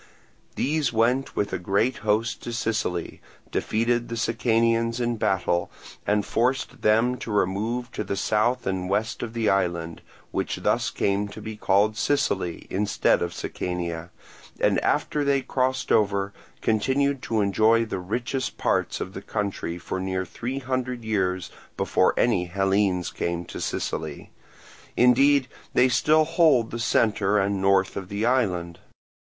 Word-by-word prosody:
These 150 Hz, -1 st, 0 dB
went 120 Hz, +4 st, +1 dB
with 100 Hz, -, -1 dB
a -, -, -1 dB
great 100 Hz, +8 st, +1 dB
host 110 Hz, +2 st, 0 dB
to 120 Hz, -, -5 dB
Sicily, 110 Hz, -7 st, -2 dB, 0.3 s
defeated 120 Hz, +2 st, 0 dB
the 115 Hz, -, -3 dB
Sicanians 115 Hz, 0 st, +1 dB
in 120 Hz, -1 st, 0 dB
battle 90 Hz, -4 st, 0 dB, 0.4 s
and 105 Hz, -1 st, +2 dB
forced 125 Hz, +3 st, -1 dB
them 115 Hz, +4 st, +3 dB
to -, -, -7 dB
remove 110 Hz, +5 st, -1 dB
to -, -, -3 dB
the 100 Hz, -, -3 dB
south 110 Hz, +5 st, +1 dB
and 95 Hz, -1 st, -2 dB
west 110 Hz, +3 st, -1 dB
of 115 Hz, -1 st, -5 dB
the 115 Hz, -2 st, 0 dB
island, 85 Hz, -4 st, 0 dB, 0.3 s
which -, -, -2 dB
thus -, -, +1 dB
came 100 Hz, +1 st, 0 dB
to 100 Hz, -, -10 dB
be 110 Hz, -1 st, -6 dB
called 105 Hz, +1 st, +2 dB
Sicily 100 Hz, -13 st, 0 dB
instead 100 Hz, +1 st, +2 dB
of 85 Hz, -, -1 dB
Sicania, 85 Hz, -2 st, -4 dB, 0.5 s
and -, -, +3 dB
after 150 Hz, -, +1 dB
they 140 Hz, -1 st, +2 dB
crossed 130 Hz, 0 st, -1 dB
over 100 Hz, -1 st, +2 dB, 0.3 s
continued 135 Hz, +5 st, +1 dB
to 110 Hz, -3 st, -1 dB
enjoy 110 Hz, +3 st, +3 dB
the 100 Hz, -4 st, -4 dB
richest 120 Hz, +7 st, -3 dB
parts -, -, 0 dB
of -, -, -5 dB
the -, -, -6 dB
country 100 Hz, -4 st, -3 dB
for 90 Hz, +2 st, -4 dB
near 95 Hz, 0 st, -2 dB
three 120 Hz, +9 st, -5 dB
hundred 125 Hz, -2 st, -3 dB
years 95 Hz, -4 st, -1 dB, 0.3 s
before -, -, +2 dB
any 100 Hz, -7 st, +2 dB
Hellenes 95 Hz, 0 st, +1 dB
came 85 Hz, 0 st, -3 dB
to -, -, -7 dB
Sicily; 75 Hz, -2 st, -4 dB, 0.7 s
indeed 130 Hz, +2 st, +5 dB, 0.3 s
they 125 Hz, -, +6 dB
still 155 Hz, +4 st, +4 dB
hold 155 Hz, -8 st, +3 dB
the 120 Hz, -, -4 dB
centre 105 Hz, -3 st, +2 dB
and 100 Hz, -1 st, +1 dB
north 95 Hz, 0 st, +3 dB
of 95 Hz, -2 st, -5 dB
the 100 Hz, +2 st, -1 dB
island. 90 Hz, -9 st, 0 dB
110 Hz, 150 wpm, -25 LUFS, 95-120 Hz, 0.7 s, they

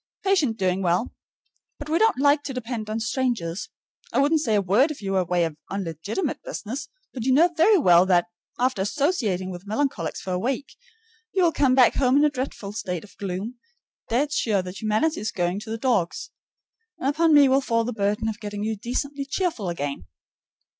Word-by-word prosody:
Patient 320 Hz, -, +2 dB
doing 185 Hz, -1 st, 0 dB
well. 180 Hz, +5 st, 0 dB, 0.6 s
But 295 Hz, -, -8 dB
we 320 Hz, +2 st, +1 dB
don't 445 Hz, -7 st, +3 dB
like 285 Hz, +2 st, +4 dB
to 270 Hz, -, -5 dB
depend 230 Hz, -3 st, -4 dB
on 220 Hz, +1 st, -2 dB
strangers. 225 Hz, -7 st, -2 dB, 0.4 s
I -, -, -2 dB
wouldn't 290 Hz, +3 st, +3 dB
say 225 Hz, -7 st, +1 dB
a -, -, +4 dB
word 205 Hz, -, +3 dB
if 305 Hz, -, -6 dB
you 195 Hz, -2 st, -4 dB
were 190 Hz, -, +2 dB
away 180 Hz, -1 st, +1 dB, 0.2 s
on 195 Hz, 0 st, -3 dB
legitimate 170 Hz, -, -3 dB
business, 275 Hz, -, -6 dB, 0.2 s
but 245 Hz, -, -5 dB
you 260 Hz, -, +2 dB
know 335 Hz, +6 st, +4 dB
very 395 Hz, +7 st, +5 dB
well 180 Hz, -, +5 dB
that, 175 Hz, -2 st, +4 dB, 0.3 s
after 250 Hz, -5 st, +1 dB
associating 205 Hz, -, 0 dB
with 180 Hz, +2 st, -9 dB
melancholics 215 Hz, -, -1 dB
for 185 Hz, -, -6 dB
a 180 Hz, -, 0 dB
week, 260 Hz, +6 st, -3 dB, 0.6 s
you 375 Hz, -, +2 dB
will 340 Hz, -, +4 dB
come 270 Hz, -4 st, +2 dB
back 255 Hz, -3 st, +6 dB
home 260 Hz, 0 st, +3 dB
in 295 Hz, -, +5 dB
a 300 Hz, -, +2 dB
dreadful 255 Hz, -7 st, -5 dB
state 180 Hz, -5 st, -4 dB
of 210 Hz, -, -16 dB
gloom, 200 Hz, +5 st, -5 dB, 0.5 s
dead 280 Hz, +6 st, +1 dB
sure 205 Hz, -8 st, +1 dB
that 180 Hz, +1 st, -8 dB
humanity 220 Hz, +10 st, +1 dB
is 215 Hz, -, -2 dB
going 175 Hz, +1 st, -1 dB
to 220 Hz, -, -10 dB
the 225 Hz, -, -3 dB
dogs; 225 Hz, -9 st, -1 dB, 0.7 s
and 260 Hz, -, -2 dB
upon 320 Hz, +3 st, +3 dB
me 290 Hz, -2 st, +7 dB
will 265 Hz, +1 st, +3 dB
fall 230 Hz, -3 st, +1 dB
the 245 Hz, +2 st, -3 dB
burden 210 Hz, +1 st, 0 dB
of 220 Hz, 0 st, -3 dB
getting 205 Hz, -1 st, -5 dB
you 220 Hz, +1 st, -1 dB
decently 275 Hz, +6 st, -3 dB
cheerful 275 Hz, -, -2 dB
again. 145 Hz, -, -4 dB
225 Hz, 200 wpm, -24 LUFS, 195-280 Hz, 0.7 s, me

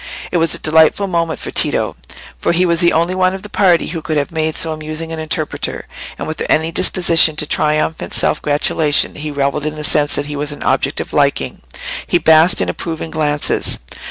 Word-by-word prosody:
It 180 Hz, -, +1 dB
was 165 Hz, -2 st, +3 dB
a -, -, -2 dB
delightful 160 Hz, +5 st, +3 dB
moment 170 Hz, -3 st, -2 dB
for -, -, -6 dB
Tito, -, -, 0 dB, 0.4 s
for -, -, 0 dB
he 180 Hz, +2 st, +2 dB
was 170 Hz, -1 st, +1 dB
the 170 Hz, -1 st, +4 dB
only 170 Hz, +3 st, +1 dB
one 185 Hz, 0 st, +1 dB
of 190 Hz, -, -9 dB
the 210 Hz, -, -9 dB
party 180 Hz, -5 st, +2 dB
who 165 Hz, -1 st, -4 dB
could 155 Hz, 0 st, -2 dB
have 145 Hz, +3 st, -2 dB
made 160 Hz, -1 st, -2 dB
so 165 Hz, -, +1 dB
amusing 155 Hz, +1 st, -4 dB
an 165 Hz, -, -5 dB
interpreter, 155 Hz, -1 st, -2 dB, 0.3 s
and -, -, -6 dB
without 155 Hz, -, -5 dB
any 160 Hz, +1 st, +1 dB
disposition 165 Hz, -4 st, +3 dB
to 150 Hz, -, +2 dB
triumphant 155 Hz, +1 st, -1 dB
self -, -, 0 dB
gratulation 150 Hz, 0 st, +2 dB
he 150 Hz, +1 st, -6 dB
revelled 145 Hz, +1 st, -2 dB
in 155 Hz, -, -4 dB
the 155 Hz, -, -6 dB
sense 145 Hz, 0 st, +1 dB
that 145 Hz, -, -1 dB
he 145 Hz, 0 st, -5 dB
was 145 Hz, +1 st, -2 dB
an -, -, -9 dB
object -, -, +1 dB
of -, -, -9 dB
liking—he -, -, -2 dB
basked 160 Hz, +1 st, +4 dB
in -, -, -1 dB
approving 160 Hz, -2 st, -5 dB
glances. 150 Hz, -2 st, -1 dB
160 Hz, 205 wpm, -16 LUFS, 150-170 Hz, 0.4 s, the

